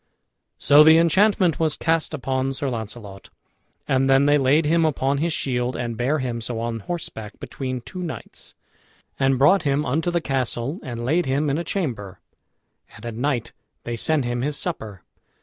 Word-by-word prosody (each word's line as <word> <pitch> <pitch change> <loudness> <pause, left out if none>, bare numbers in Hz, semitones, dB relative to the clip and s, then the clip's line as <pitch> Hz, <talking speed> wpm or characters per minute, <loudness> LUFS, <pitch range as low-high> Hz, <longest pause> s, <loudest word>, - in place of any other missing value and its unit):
So 145 +2 +6
the 160 +1 +7
enchantment 180 +1 +3
was 160 -2 +1
cast 165 -1 0
upon 135 -1 -2
Sir 135 0 -3
Launcelot. 110 -4 -7 0.6
And 135 0 +2
then 135 +1 +5
they 145 0 +4
laid 140 +4 +3
him 165 +2 +3
upon 140 -3 0
his 165 +3 0
shield, 125 -3 -1
and 120 -1 -3
bare 125 +7 0
him 125 -4 -3
so 115 0 -4
on 115 0 -3
horseback 110 - -7
between 130 -2 -5
two 185 +9 -8
knights, 170 -3 -7 0.6
and 135 -1 +2
brought 150 +9 +5
him 145 0 0
unto 160 +7 0
the 175 0 +1
castle 135 - -2
and 120 -4 -6
laid 165 +6 +1
him 140 +2 0
in 145 - -1
a - - -2
chamber, 115 - -4 0.8
and 105 - -12
at 115 - -4
night 120 0 -2 0.3
they 120 - -4
sent 145 +3 +1
him 120 0 -2
his 145 +2 -1
supper. 110 - -5
135 Hz, 175 wpm, -23 LUFS, 120-155 Hz, 0.8 s, the